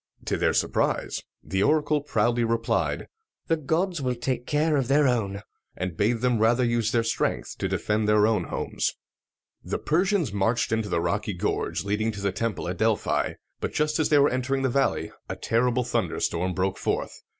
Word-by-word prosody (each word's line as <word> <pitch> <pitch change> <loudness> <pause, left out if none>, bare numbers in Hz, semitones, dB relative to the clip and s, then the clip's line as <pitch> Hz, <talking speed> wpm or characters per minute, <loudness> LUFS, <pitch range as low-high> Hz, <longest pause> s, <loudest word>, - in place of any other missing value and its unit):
To - - 0
their - - +1
surprise, - - 0 0.2
the 95 +5 -1
oracle 150 +3 +2
proudly 120 -3 +1
replied, 115 0 0 0.4
"The 165 - +2
gods 165 +3 -1
will 125 -2 0
take 125 +1 -3
care 150 +1 +2
of 135 -4 +1
their 140 +1 +4
own," 105 -5 -1 0.3
and 90 -3 -3
bade 110 +5 +1
them 125 -2 +2
rather 115 +3 +3
use 120 -2 +1
their 115 -1 +2
strength 115 - -1
to - - 0
defend 105 0 0
their 105 0 +5
own 110 0 +1
homes. - - -2 0.7
The - - -2
Persians 175 - +1
marched 110 +5 +1
into 110 -2 0
the 85 -2 +1
rocky 85 +4 -1
gorge 85 - -1
leading 105 +3 0
to 100 - -7
the 100 -1 0
temple 110 +1 -2
at - - -4
Delphi, - - +1 0.3
but - - -3
just 155 +1 +1
as 155 - +2
they 150 - +5
were 140 0 +5
entering 130 +2 -1
the 130 - +2
valley 135 +2 0 0.2
a - - -3
terrible 125 +2 +1
thunderstorm 90 -5 -1
broke 95 +1 -1
forth. - - -2
120 Hz, 185 wpm, -26 LUFS, 105-140 Hz, 0.7 s, their